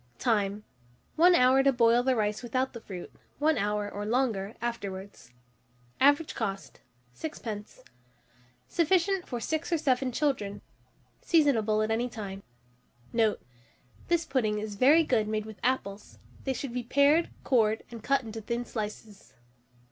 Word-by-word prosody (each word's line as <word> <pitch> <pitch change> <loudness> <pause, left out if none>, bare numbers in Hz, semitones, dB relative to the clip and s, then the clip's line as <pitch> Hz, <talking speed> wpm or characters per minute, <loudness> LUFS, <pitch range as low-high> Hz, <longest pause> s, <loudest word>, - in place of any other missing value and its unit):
Time. 210 -3 0 0.5
1 350 +2 +6
hour 255 0 +5
to 275 0 +4
boil 235 -1 +4
the 260 +1 +1
rice 210 -1 -1
without 255 +2 -1
the 235 - -8
fruit; 185 -5 -9 0.2
1 300 -1 +2
hour, 205 0 -1
or 205 0 -5
longer, 220 -3 -1
afterwards. 200 - -6 0.7
Average 290 +3 +4
cost, 195 -4 -5 0.3
6d. 220 -9 -7 0.8
Sufficient 360 +2 +1
for 245 - -4
6 315 +8 -3
or 335 - +3
7 260 -3 +1
children. 235 -8 -1 0.6
Seasonable 225 -10 +3
at 215 - -1
any 235 +3 0
time. 200 -4 -7 0.7
Note. 225 -2 +1 0.6
This 340 -1 +1
pudding 220 -8 0
is 210 0 -4
very 285 +10 +5
good 235 -8 +1
made 215 0 -2
with 220 -2 -10
apples: 210 -6 -2 0.3
they 265 - 0
should 260 -1 -5
be 250 - -2
pared 285 +7 +3
cored, 220 -4 +2
and 230 -1 -8
cut 275 +1 +2
into 225 -1 -7
thin 235 +3 -3
slices. 210 -2 -7
235 Hz, 140 wpm, -29 LUFS, 210-275 Hz, 0.8 s, 1